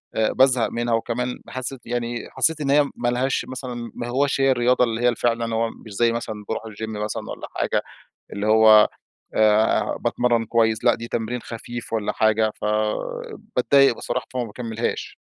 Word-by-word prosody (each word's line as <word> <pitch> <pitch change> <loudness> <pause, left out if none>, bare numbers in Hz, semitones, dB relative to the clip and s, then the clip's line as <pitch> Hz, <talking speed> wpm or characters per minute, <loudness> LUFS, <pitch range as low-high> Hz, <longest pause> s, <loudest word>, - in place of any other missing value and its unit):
بازهق 125 +3 +3
منها. 120 0 -1
وكمان 125 +2 -2
حسِّيت 130 0 -6
يعني 120 0 -3
حسِّيت 160 -1 +1
إن 140 - -1
هي 145 -1 +4
ما 120 - -2
لهاش 130 +2 0
مثلًا، 125 -3 -6
ما 120 - -4
هوّاش 135 +2 +1
هي 135 0 +4
الرياضة 125 0 +3
اللي 115 0 -1
هي 120 -1 +3
فعلًا. 115 -1 0
هو 115 0 +1
مش 110 - -13
زي 115 +3 +2
مثلًا 110 -3 -4
باروح 110 - -3
الGym 110 0 -6 0.2
مثلًا 105 - -4
والّا - - -7
حاجة، - - 0 0.5
اللي 100 +1 -2
هو 110 -1 +7 0.5
آآ 110 0 +3
باتمرن 120 -2 +1
كويس، 110 -1 +1
لا - - +5
دي 115 0 -7
تمرين 120 +1 -3
خفيف 120 +1 -7
والّا 110 -2 0
حاجة. 110 0 +2
فباتضايق 115 +5 +1
بصراحة، - - -3
فما 125 -1 -1
باكملهاش. 115 +1 -4
115 Hz, 165 wpm, -23 LUFS, 110-125 Hz, 0.5 s, هو